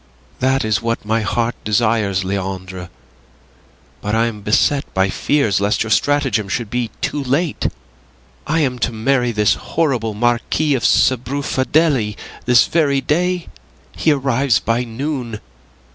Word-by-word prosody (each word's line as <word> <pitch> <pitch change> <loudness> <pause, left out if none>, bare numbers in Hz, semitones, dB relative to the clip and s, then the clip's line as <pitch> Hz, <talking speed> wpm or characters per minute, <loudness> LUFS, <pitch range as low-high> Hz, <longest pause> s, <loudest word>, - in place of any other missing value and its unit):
"That 130 -1 +1
is 110 -2 +1
what 115 -2 -2
my 110 +1 +1
heart 115 +3 0
desires, 105 -3 +1
Leandre, 95 -2 -4 1.1
but 105 +2 -1
I 115 +1 +3
am 110 -3 -4
beset 125 +7 +1
by 95 0 +2
fears 115 -8 +1
lest 100 +2 +1
your 110 - -5
stratagem 135 -5 +1
should 115 0 -3
be 120 -2 -1
too 145 - -2
late. 140 +5 0 0.8
I 160 +2 +1
am 125 -4 -1
to 120 - 0
marry 120 +2 +1
this 105 -2 +3
horrible 125 -10 -1
Marquis 120 +6 +1
of 130 - 0
Sbrufadelli 130 -1 +1 0.3
this 125 +1 +5
very 145 -5 +1
day. 180 +4 0 0.5
He 160 - +2
arrives 135 -3 +2
by 115 +2 0
noon. 120 -2 -4
120 Hz, 135 wpm, -18 LUFS, 110-140 Hz, 1.1 s, this